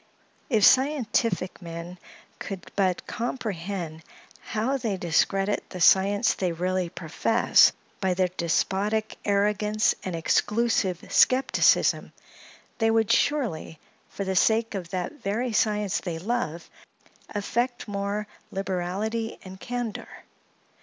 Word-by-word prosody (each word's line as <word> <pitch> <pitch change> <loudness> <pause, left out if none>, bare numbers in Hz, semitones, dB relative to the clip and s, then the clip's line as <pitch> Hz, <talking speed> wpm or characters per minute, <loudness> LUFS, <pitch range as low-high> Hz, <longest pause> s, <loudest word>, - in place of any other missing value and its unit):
If 220 -6 +4
scientific 255 -8 +2
men 170 +1 -8 0.4
could 195 -2 -7
but 190 -3 +1
comprehend 195 -9 -4 0.4
how 230 +5 -1
they 220 -7 -2
discredit 195 +4 +1
the 185 - -7
science 200 +5 +4
they 180 -3 -1
really 180 +1 -1
profess, 185 +8 +3 0.3
by 190 -2 0
their 185 0 +1
despotic 195 +5 -1
arrogance 210 +2 +2
and 185 -2 -3
exclusive 200 +2 +1
skepticism, 260 +1 +3 0.7
they 225 -1 +3
would 225 -1 +2
surely, 235 - 0 0.3
for 200 - -5
the 190 -1 -2
sake 225 +4 +3
of 185 -4 -5
that 185 - -4
very 225 +4 -1
science 210 -2 +1
they 170 -3 -4
love, 180 -4 -3 0.6
affect 240 +4 -2
more 200 +1 -2 0.2
liberality 195 +4 -3
and 190 0 -10
candor. 245 -2 -4
200 Hz, 110 wpm, -26 LUFS, 180-225 Hz, 0.7 s, If